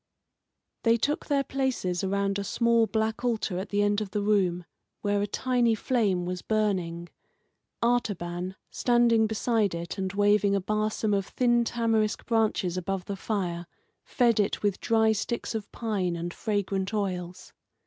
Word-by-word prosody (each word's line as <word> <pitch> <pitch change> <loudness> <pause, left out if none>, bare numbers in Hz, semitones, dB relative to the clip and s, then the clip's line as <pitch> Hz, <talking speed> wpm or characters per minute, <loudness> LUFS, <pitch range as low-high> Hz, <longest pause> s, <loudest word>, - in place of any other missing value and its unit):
They 230 0 +4
took 290 +6 -1
their 280 -2 +2
places 255 -11 -1
around 200 +1 0
a - - -2
small 235 +2 +2
black 220 +1 -1
altar 220 -6 -1
at 190 +2 -5
the 205 0 +1
end 205 +1 +1
of 210 - -4
the 205 +2 -2
room, 185 -4 +1 0.4
where 205 -1 +1
a 205 - 0
tiny 240 +1 +1
flame 205 -7 0
was 180 0 -4
burning. 180 -6 -1 0.7
Artaban, 185 -6 -1 0.2
standing 235 -2 +3
beside 220 -3 0
it, 170 +3 -5
and 190 -1 -2
waving 205 0 +3
a - - +2
barsom 215 +2 -1
of 195 -1 0
thin 240 -1 +2
tamarisk 225 -2 0
branches 215 -6 +1
above 185 0 -3
the 200 - -4
fire, 180 -4 -3 0.4
fed 235 -4 +2
it 205 0 0
with 205 -2 +1
dry 220 -1 +3
sticks 225 +3 -2
of 215 -2 -5
pine 200 -7 -1
and 170 +1 -4
fragrant 200 -1 -2
oils. 180 -3 -4
205 Hz, 155 wpm, -27 LUFS, 190-225 Hz, 0.7 s, They